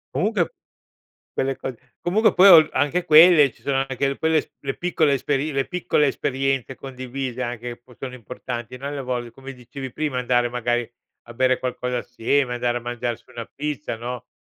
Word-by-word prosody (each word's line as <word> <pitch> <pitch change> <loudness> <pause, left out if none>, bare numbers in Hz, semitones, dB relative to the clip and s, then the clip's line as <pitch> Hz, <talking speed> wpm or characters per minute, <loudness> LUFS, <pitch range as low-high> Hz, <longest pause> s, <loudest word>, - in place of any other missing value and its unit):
Comunque 200 -4 0 0.8
quelle 135 0 -1
cose 125 -2 -8
comunque 215 +6 +2
poi 190 +2 +7
o 160 -4 +9
anche 165 +5 +1
quelle 155 -3 +7
ci - - -25
sono 135 -1 0
anche 135 +1 0
le 140 - -2
quelle 160 0 +2
s - - -8
le 135 -1 -4
piccole 165 -4 +1
esperi 145 +3 -1
le 135 -1 -1
piccole 165 -4 +1
esperienze 135 -1 -1
condivise 130 -1 -6
anche, 120 0 -4
che 120 - -32
poi 125 -1 -19
sono 130 -2 -6
importanti, 125 0 -7
no, 135 +2 -6
alle 145 -1 -4
volte 125 -2 -4
come 135 +2 -10
dicevi 130 +1 -8
prima: 150 -1 -2
andare 125 -1 +2
magari 120 -1 -1 0.3
a 120 - -12
bere 130 +1 +2
qualcosa 125 0 -3
assieme, 125 +2 0
andare 120 0 0
a - - -4
mangiarsi 120 -1 -4
una 120 - -6
pizza, 150 -4 -4
no, 120 +1 -6
130 Hz, 185 wpm, -23 LUFS, 120-145 Hz, 0.8 s, o